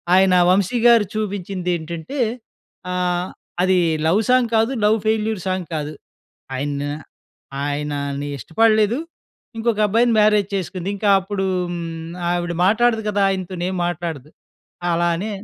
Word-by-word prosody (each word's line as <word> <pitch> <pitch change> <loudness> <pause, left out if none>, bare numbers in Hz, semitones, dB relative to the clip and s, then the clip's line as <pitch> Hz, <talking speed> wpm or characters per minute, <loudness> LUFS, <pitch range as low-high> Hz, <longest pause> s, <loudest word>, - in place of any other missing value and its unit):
ఆయన 190 -1 +5 0.2
'వంశీ' 200 +5 +2
గారు 230 -3 +6
చూపించిందేంటంటే, 180 - -3 0.7
ఆహ్, 180 0 -1 0.3
అది 185 0 +3 0.3
లవ్ 195 +7 +3
సాంగ్ 250 -2 +4
కాదు 225 +3 +3
లవ్ 220 +1 +4
ఫెయిల్యూర్ 220 -2 0
సాంగ్ 185 -2 -2
కాదు 150 0 -3 0.6
ఆయన 140 +1 -2 0.8
ఆయనని 145 -1 -3
ఇష్టపడలేదు 215 - +2 0.6
ఇంకొక 225 -1 0
అబ్బాయిని 230 +3 +3
మ్యారేజ్ 210 -2 +4
చేసుకుంది. 185 0 -3
ఇంక 210 - -5
అప్పుడు 195 0 -3 0.3
హ్మ్, 165 -1 -6 0.2
ఆవిడ 175 0 -1
మాట్లాడదు 225 +2 +3
కదా, 205 -1 0
ఆయనతో 185 -1 -3
ఏం 190 - -3
మాట్లాడదు. 160 -5 -4 0.6
అలా 170 +1 +1
అని 205 +6 -4
185 Hz, 120 wpm, -21 LUFS, 170-215 Hz, 0.8 s, గారు